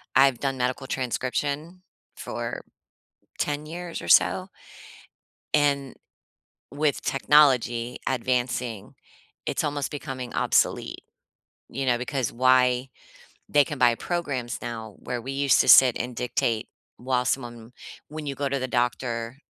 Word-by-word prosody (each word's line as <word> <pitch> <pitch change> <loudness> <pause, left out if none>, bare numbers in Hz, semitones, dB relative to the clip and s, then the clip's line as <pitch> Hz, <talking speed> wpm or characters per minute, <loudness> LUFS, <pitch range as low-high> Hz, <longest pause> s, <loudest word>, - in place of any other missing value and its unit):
I've 135 -3 +5
done 135 -1 -2
medical 125 +1 -2
transcription 140 +7 -3 0.3
for - - -5 0.8
10 150 +1 -2
years 170 +1 -6
or 85 - -8
so. - - +4 1.1
And 140 -3 +1 0.8
with 150 0 0
technology 125 -4 +3
advancing, 125 -3 -2 0.5
it's - - -1
almost 145 -1 -2
becoming 135 -4 -6
obsolete. - - +1 0.7
You 135 +2 -3
know, 120 -2 +2
because 125 0 -2
why 125 +1 +3 0.6
They 145 -1 +5
can 145 -5 -6
buy 120 -2 +5
programs 140 -9 -3
now 110 -3 -6
where 125 -1 -4
we 135 - -6
used 140 -1 +3
to - - -2
sit 130 -3 +8
and 125 0 -4
dictate 115 -2 -1 0.3
while 125 0 -1
someone 120 -2 -3 0.4
When 155 0 -7
you 140 - -3
go 140 -1 -2
to 140 0 -1
the 130 - -2
doctor, 120 0 -2
130 Hz, 125 wpm, -25 LUFS, 120-140 Hz, 1.1 s, sit